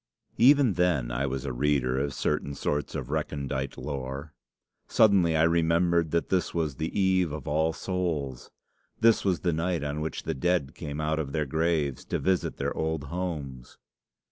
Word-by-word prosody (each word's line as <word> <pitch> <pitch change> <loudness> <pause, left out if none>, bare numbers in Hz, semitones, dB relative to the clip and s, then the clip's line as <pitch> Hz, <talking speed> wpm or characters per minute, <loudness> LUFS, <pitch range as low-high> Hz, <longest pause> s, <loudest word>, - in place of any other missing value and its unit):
"Even 135 -2 +6
then 85 -10 +1
I 70 +3 -1
was 65 0 -3
a 65 - -3
reader 65 -1 +1
of 70 -1 -2
certain 70 - -1
sorts 75 +1 -2
of 65 +1 -4
recondite 70 -3 -3
lore. 70 +1 -5 0.5
Suddenly 95 -7 +4
I 80 - +4
remembered 85 0 +3
that 85 +2 0
this 95 -2 0
was 80 -5 -1
the 80 +5 -2
eve 95 -4 +2
of 75 -2 -6
All 80 +2 +2
Souls. 80 -8 -3 0.5
This 115 -1 +4
was 95 -4 +1
the 85 -2 +1
night 85 0 -1
on 75 +1 -3
which 80 - -4
the - - -2
dead 80 0 0
came 75 -2 -6
out 80 0 0
of 70 -3 -4
their 75 -2 0
graves 80 -2 0
to - - -1
visit 95 -2 0
their - - -2
old 80 -2 -1
homes. 70 -9 -5
80 Hz, 170 wpm, -27 LUFS, 70-85 Hz, 0.5 s, Even